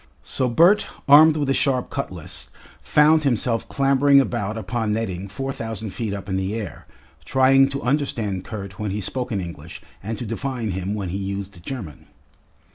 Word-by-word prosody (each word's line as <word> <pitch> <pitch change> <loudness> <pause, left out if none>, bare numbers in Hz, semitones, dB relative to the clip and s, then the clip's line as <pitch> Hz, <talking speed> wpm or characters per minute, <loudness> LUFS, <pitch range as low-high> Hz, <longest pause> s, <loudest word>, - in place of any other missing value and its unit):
So 130 - -1
Bert, 175 - +4 0.2
armed 155 +2 +8
with 145 -2 -1
a 135 - +2
sharp 135 -2 0
cutlass, - - -6 0.3
found 155 +1 +4
himself 120 -3 0
clambering 140 0 +4
about 115 -5 -1
upon 110 +1 -2
netting 100 -4 -3
four 135 +6 -4
thousand 110 -4 -5
feet 105 +3 -4
up 100 -1 -6
in 95 -1 -1
the 95 +3 -2
air, 100 -10 -6 0.4
trying 135 +1 +4
to 140 0 -5
understand 120 -8 -1
Kurt 100 -3 -8
when 105 -1 -2
he 100 +2 -2
spoke 125 +6 -3
in 100 - -1
English 85 -2 -8 0.2
and 110 +3 -4
to 120 - -5
divine 115 0 -3
him 95 +3 -3
when 100 -4 -4
he 95 +3 -3
used 100 -2 -5
German. 95 - -7
115 Hz, 175 wpm, -22 LUFS, 100-135 Hz, 0.4 s, armed